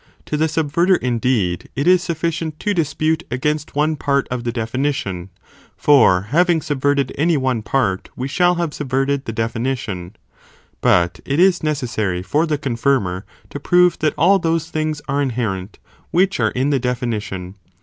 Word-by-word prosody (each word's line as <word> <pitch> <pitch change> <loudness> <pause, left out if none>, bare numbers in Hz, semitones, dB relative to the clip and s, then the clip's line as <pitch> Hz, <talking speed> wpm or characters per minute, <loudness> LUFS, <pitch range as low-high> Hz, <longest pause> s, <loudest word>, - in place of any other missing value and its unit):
To - - -3
the 155 +2 +2
sub 155 -2 -2
verter 175 +4 +3
indeed, 120 -7 -1
it 140 - -1
is 180 -1 +5
sufficient 165 -2 -3
to 210 - 0
dispute 160 -1 0
against 150 +5 -2
one 155 +2 +1
(part 140 -1 0
of 125 -1 -3
the 120 - -1
definition), 115 -6 -2 0.5
(for 115 -11 +5
having 175 +1 +3
subverted 140 -2 0
any 165 +1 +3
one 130 -4 0
part, 105 -5 -1
we 130 - -3
shall 175 +5 +2
have 170 -3 -2
subverted 135 0 -1
the - - -3
definition, 115 -4 -3 0.3
) - - -32
but 85 -1 +2
it 140 +3 -1
is 185 -1 +4
necessary 115 - -2
fon 150 - +1
the 150 -2 0
confirmer, 115 -8 -1 0.3
to 145 - -5
prove 180 +4 +3
that 155 -1 0
all 190 +5 +4
those 165 -1 -1
things 155 -1 -2
are 140 0 0
inherent, 110 -7 -3 0.3
which 190 +3 +2
are - - +3
in 135 +3 0
the 140 - +2
definition. 115 -7 -3
140 Hz, 165 wpm, -19 LUFS, 115-160 Hz, 0.5 s, is